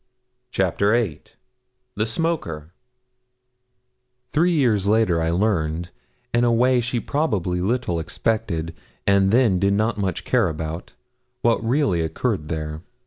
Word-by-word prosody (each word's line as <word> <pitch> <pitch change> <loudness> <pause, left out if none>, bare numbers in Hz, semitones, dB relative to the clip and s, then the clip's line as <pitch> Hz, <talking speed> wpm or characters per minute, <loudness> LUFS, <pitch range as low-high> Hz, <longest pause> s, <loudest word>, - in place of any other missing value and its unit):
CHAPTER 100 +1 +1
VIII 110 -11 0 0.7
THE 110 +2 -1
SMOKER 110 - -2 1.6
Three 170 +4 +3
years 115 - +2
later 105 -6 +3
I 80 - 0
learned 85 -3 0 0.4
in 120 0 +3
a 120 - +3
way 125 +2 +3
she 120 +1 -1
probably 100 - -1
little 100 -4 0
expected, 85 -2 -2 0.3
and 100 -1 +4
then 110 -4 +3
did 100 +1 +2
not 110 +1 0
much 95 -2 -2
care 115 -5 +2
about 80 +2 -5 0.5
what 115 -1 +2
really 115 - +1
occurred 80 +1 -2
there. 75 -1 -4
100 Hz, 125 wpm, -22 LUFS, 85-120 Hz, 1.6 s, and